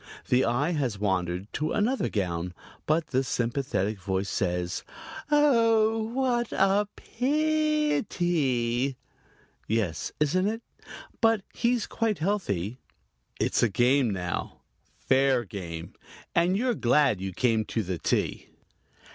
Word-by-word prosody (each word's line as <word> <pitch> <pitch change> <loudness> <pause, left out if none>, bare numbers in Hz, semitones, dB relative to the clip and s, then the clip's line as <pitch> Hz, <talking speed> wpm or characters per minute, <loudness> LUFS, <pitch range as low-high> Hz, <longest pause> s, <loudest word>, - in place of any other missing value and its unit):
The 125 +1 +4
eye 135 +8 +1
has 135 - -1
wandered 95 -2 -1
to 155 +2 -1
another 240 +6 +1
gown, 90 -3 -2 0.3
but 155 +1 +1
the 130 +1 +1
sympathetic 120 -5 -1
voice 95 +1 -2
says: 90 -4 -1 0.5
"Oh, 230 -7 +4
what 240 -1 0
a 195 +2 +3
pi 305 +3 +1
i - - +1
ty!" 135 -7 0 0.7
"Yes, 105 -7 -1
isn't 180 +6 +2
it? 225 +2 -3 0.6
But 225 -3 +3
he's 235 -1 +1
quite 225 -4 -1
healthy." 130 - -1 0.6
It's - - +1
a 120 - +4
game 125 +4 +3
now 90 -3 -4 0.4
fair 130 -1 +2
game 85 -4 -7 0.4
and 175 +3 +3
you're 245 +2 +1
glad 120 - +2
you 95 0 -3
came 110 +2 +1
to 110 - -2
the 90 -2 -4
tea! - - -1
135 Hz, 120 wpm, -27 LUFS, -, 0.7 s, The